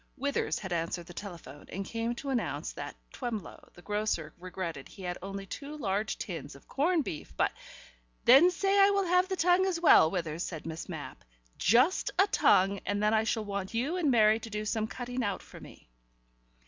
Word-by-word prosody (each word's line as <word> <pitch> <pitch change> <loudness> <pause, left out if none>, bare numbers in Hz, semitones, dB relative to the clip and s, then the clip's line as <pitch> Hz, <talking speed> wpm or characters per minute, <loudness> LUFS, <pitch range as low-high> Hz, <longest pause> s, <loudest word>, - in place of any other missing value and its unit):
Withers 280 +1 -1
had 190 -3 -5
answered 170 +1 -2
the 175 - -11
telephone, 170 -8 -9
and 195 +1 -4
came 230 +3 -2
to 275 +3 -5
announce 250 - -2
that - - -7 0.2
Twemlow 230 -8 -6
the 175 - -15
grocer 205 -7 -2
regretted 175 -5 -5
he 195 - -12
had 180 0 -4
only 195 +1 -6
two 285 +9 -7
large 210 -4 -1
tins 170 -7 -6
of 140 - -17
corned 315 +4 +1
beef, 155 - -6
but - - +2 0.7
"Then 275 +9 +8
say 390 +3 +1
I 395 0 +7
will 400 -1 +2
have 360 +1 +3
the 380 - 0
tongue 360 +2 +3
as 355 -3 -1
well, 310 - +7
Withers," 165 -3 -3
said 165 -4 -5
Miss 160 0 -6
Mapp. - - -7 0.4
"Just 250 - +3
a 390 - +6
tongue 195 - +3
and 205 +1 -1
then 210 +1 +3
I 220 0 +3
shall 225 -1 -1
want 200 +1 -4
you 270 +9 0
and 325 -5 +1
Mary 220 -3 +5
to 225 - -8
do 210 0 -4
some 215 0 -1
cutting 245 +2 -4
out 200 -3 -2
for - - -13
me." - - -14
215 Hz, 200 wpm, -30 LUFS, 185-280 Hz, 0.7 s, Then